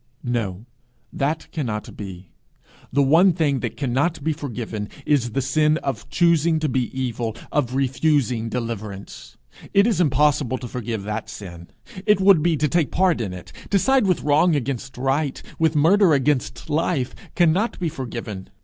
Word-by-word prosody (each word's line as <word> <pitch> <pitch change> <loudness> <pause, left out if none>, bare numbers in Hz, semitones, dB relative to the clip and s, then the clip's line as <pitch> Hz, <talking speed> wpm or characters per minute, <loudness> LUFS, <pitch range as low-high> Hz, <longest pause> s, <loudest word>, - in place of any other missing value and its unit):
'No; 110 -4 -2 0.5
that 150 +4 -1
cannot 115 -10 -4
be. 95 -3 -9 0.6
The 140 +2 +3
one 165 +7 +5
thing 150 -5 +1
that 115 -2 -4
cannot 140 +5 0
be 160 +1 +1
forgiven 115 -7 -5 0.2
is 125 -6 +1
the 135 - 0
sin 150 +3 +2
of 135 - -4
choosing 170 -2 +3
to 155 0 0
be 130 -2 0
evil, 120 -3 -2 0.2
of 130 -4 0
refusing 135 -3 +1
deliverance. 110 -5 -6 0.4
It 200 +1 +6
is 220 -7 +2
impossible 145 -3 +2
to 125 - -7
forgive 115 -3 -4
that 105 +2 -4
sin. 85 -4 -9 0.4
It 210 -2 +5
would 190 -4 +6
be 165 0 +2
to 150 - +1
take 165 0 +1
part 180 -7 +2
in 100 -5 -3
it. 90 -1 -10 0.2
To 200 - +3
side 265 +1 +3
with 185 - +1
wrong 155 +3 +3
against 135 -1 -3
right, 135 +2 0 0.2
with 160 -1 +2
murder 170 +3 +5
against 140 -1 -1
life, 150 -4 0 0.2
cannot 180 +6 +2
be 175 - -1
forgiven. 115 - -6
140 Hz, 160 wpm, -22 LUFS, 120-160 Hz, 0.6 s, It